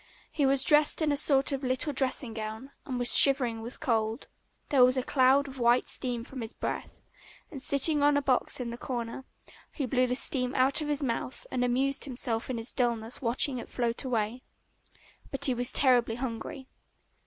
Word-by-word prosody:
He 285 -3 0
was 270 0 +2
dressed 300 0 +4
in 305 - +1
a - - +1
sort 275 0 +2
of 275 -1 -3
little 260 +3 -1
dressing 260 -3 0
gown 220 +4 -7 0.2
and 255 -2 -4
was 245 0 +4
shivering 250 -5 +5
with 235 +3 -9
cold. 225 -2 -2 0.4
There 270 -3 +4
was 255 +1 +4
a 255 - 0
cloud 270 +2 +2
of 270 -1 -10
white 240 +1 +2
steam 245 -2 0
from 260 0 -7
his 225 - -6
breath, - - -6 0.5
and 275 -5 -8
sitting 285 +2 +2
on 290 0 +3
a - - +1
box 260 -1 0
in 240 -2 -5
the 235 - -8
corner, 240 0 -6 0.5
he 285 - -4
blew 255 0 +1
the 250 - -1
steam 255 -1 +1
out 265 +4 +3
of 300 - -4
his 295 -1 -2
mouth 250 0 -4
and 250 -1 -1
amused 270 +3 0
himself 245 -3 -3
in 255 - -3
his 230 +1 -7
dullness 235 -2 -2
watching 255 +2 +1
it - - -10
float 235 -2 -2
away. 235 -1 -2 0.9
But 275 - +2
he 260 - +4
was 245 +1 +1
terribly 245 -4 +2
hungry. 255 +2 -6
255 Hz, 195 wpm, -28 LUFS, 235-275 Hz, 0.9 s, shivering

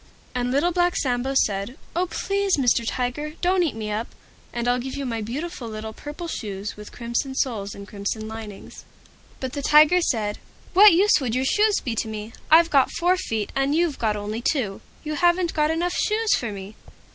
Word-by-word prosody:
And 245 -1 -1
Little 285 +7 +2
Black 355 0 +2
Sambo 260 +1 -1
said, 200 +6 -4 0.2
"Oh! 360 +2 +1
Please 395 -1 0
Mr. 245 -3 +3
Tiger, 255 +6 -2
don't 365 +1 +2
eat 325 -8 0
me 215 -1 -4
up, 220 +3 -2 0.4
and 240 0 -3
I'll 245 0 +2
give 260 +2 -5
you 280 -1 -3
my 230 -3 -2
beautiful 260 +4 -5
little 220 0 -6
Purple 295 +8 -7
Shoes 205 -8 -5
with 210 0 -11
Crimson 235 +3 -3
Soles 210 -7 -2
and 200 0 -10
Crimson 210 +2 -4
Linings." 220 -2 -9 0.6
But 260 -1 -4
the 285 - -3
Tiger 305 +5 +6
said, 215 -9 -1 0.3
"What 405 +1 +9
use 370 -3 +4
would 245 -3 -1
your 260 +1 +1
shoes 420 +7 +3
be 245 - -3
to - - -1
me? 215 0 -6 0.2
I've 330 +2 +6
got 275 -3 +4
four 355 +2 +3
feet, 225 - -3
and 275 +2 +1
you've 335 -3 +1
got 215 -2 +1
only 210 +2 -4
two; 235 -8 -1 0.2
you 305 -1 -3
haven't 345 +2 +2
got 300 -1 +2
enough 345 +2 0
shoes 435 0 +1
for 235 -3 -3
me." 200 +1 -8
260 Hz, 195 wpm, -24 LUFS, 220-335 Hz, 0.6 s, What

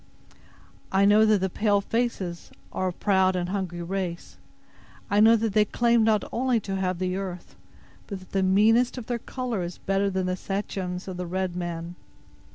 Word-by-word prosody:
"I 195 +1 +4
know 210 +2 +6
that 210 -3 +3
the 190 - +1
pale 205 0 +2
faces 200 -5 -2 0.2
are 185 - -1
a - - 0
proud 190 0 +2
and 180 -1 -2
hungry 185 -3 -3
race. 180 -1 -4 0.7
I 205 - +3
know 225 +2 +7
that 225 -2 -1
they 215 0 +5
claim 235 +2 +2
not 220 -1 +3
only 250 -1 +1
to 195 -1 -4
have 185 -2 -1
the 185 +1 -2
earth, 185 -3 -6 0.5
but 200 - -5
that 185 - -17
the 195 - +1
meanest 220 +7 +3
of 245 - -6
their 240 0 -2
color 245 -4 -4
is 175 0 -5
better 195 +1 0
than 190 -1 -1
the 185 0 -1
Sachems 190 -1 -4
of 185 -2 -5
the 180 -1 -4
red 185 0 -2
man. 170 -1 -4
195 Hz, 185 wpm, -26 LUFS, 185-215 Hz, 0.7 s, know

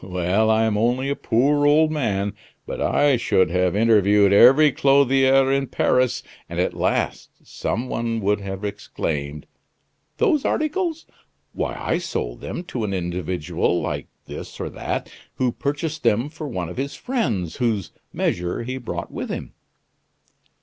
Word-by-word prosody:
Well, 95 +4 +1
I 110 0 +3
am 110 -2 +1
only 125 +4 +1
a 140 - 0
poor 145 +6 +2
old 155 +1 +4
man, 105 -9 -1 0.3
but - - -5
I 145 -3 +3
should 95 -7 +2
have 90 0 +1
interviewed 105 -2 +4
every 135 +8 +7
clothier 135 -1 +4
in 135 0 +1
Paris; 125 0 +1 0.3
and - - -4
at - - +1
last - - -1
some 120 +3 -3
one 115 -2 -2
would 105 +1 +1
have 95 +1 -5
exclaimed: 75 -7 -4 0.7
'Those 340 - +2
articles! 325 +1 -1 0.5
Why, - - -3
I 165 - 0
sold - - -4
them 175 - -5
to 125 -9 -4
an 100 -2 -2
individual 90 -1 -1
like - - -3 0.2
this - - -9
or - - -4
that - - -4 0.2
who 125 -1 +1
purchased 145 +5 -3
them 115 +7 +2
for 155 -1 -7
one 90 -10 -3
of 90 - -9
his 140 +2 -3
friends 120 - -2
whose 110 -6 -1 0.2
measure 90 +6 -1
he 130 +2 -4
brought 120 - -5
with - - -5
him. - - -5
115 Hz, 150 wpm, -22 LUFS, 95-140 Hz, 0.7 s, every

